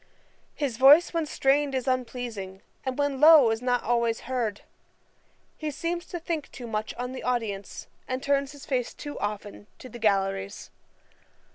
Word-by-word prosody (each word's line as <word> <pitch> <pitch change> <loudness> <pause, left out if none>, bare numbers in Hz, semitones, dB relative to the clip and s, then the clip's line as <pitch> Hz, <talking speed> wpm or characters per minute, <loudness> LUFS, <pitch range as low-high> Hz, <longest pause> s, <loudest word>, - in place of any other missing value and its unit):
His 270 -6 -2
voice 290 +8 +7
when 330 -2 0
strained 275 0 +1
is 260 0 -2
unpleasing, 240 -7 -3 0.2
and 260 -1 -3
when 285 -2 -1
low 300 -7 +8
is 225 +1 -2
not 245 -1 0
always 235 -1 +1
heard. 235 -5 -2 0.9
He 310 - -4
seems 340 +4 -3
to 345 - -5
think 325 -3 -4
too 245 - -8
much 215 -1 -3
on 250 +1 -4
the 260 - -6
audience, 220 -6 -3 0.2
and 255 +1 -3
turns 280 0 +1
his 285 -1 -12
face 255 -5 -2
too 290 -1 -7
often 205 0 -5
to 255 - -11
the 240 - -10
galleries. 195 -2 -1
250 Hz, 160 wpm, -27 LUFS, 225-285 Hz, 0.9 s, low